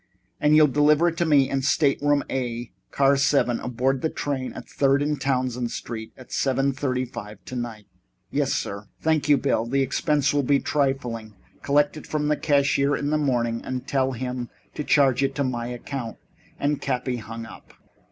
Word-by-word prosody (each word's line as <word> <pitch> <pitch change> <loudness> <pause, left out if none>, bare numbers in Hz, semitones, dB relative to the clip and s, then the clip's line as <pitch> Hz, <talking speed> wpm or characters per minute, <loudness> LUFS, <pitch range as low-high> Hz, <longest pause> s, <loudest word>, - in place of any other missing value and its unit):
"And 150 +1 +4
you'll 155 0 +8
deliver 150 +4 +4
it 165 - -8
to 170 - +1
me 140 -4 +5
in 135 - -1
stateroom 145 +1 +2
A, 120 -2 -3 0.2
car 140 0 +3
7, 135 -3 +2
aboard 125 +2 -1
the 160 - 0
train 135 -4 -3
at - - -9
Third 135 0 +2
and 150 0 -1
Townsend 125 -3 0
Streets, 110 -2 -6
at 130 - -14
seven 135 +1 +1
fifty 130 -1 -1
five 110 -4 -8
tonight?" 120 -4 -5 0.5
"Yes, - - 0
sir." 100 +1 -3
"Thank 155 -2 +1
you, 145 - +6
Bill. 125 -5 0
The 135 +3 +2
expense 145 +2 +1
will 145 - +3
be 140 +1 +3
trifling. 125 -8 -1 0.3
Collect 145 +2 +2
it - - -10
from 150 -1 -1
the 150 - +3
cashier 140 -1 +2
in 145 +1 -2
the 155 - +2
morning, 120 -5 0
and 130 -1 -4
tell 135 -1 +1
him 125 0 -4 0.2
to 150 - -4
charge 135 -3 +3
it 135 -1 0
to 140 - 0
my 120 -3 -2
account." 125 0 -5 0.4
And 145 0 0
Cappy 125 0 -1
hung 115 0 -7
up. 110 - -14
135 Hz, 180 wpm, -24 LUFS, 120-145 Hz, 0.5 s, you'll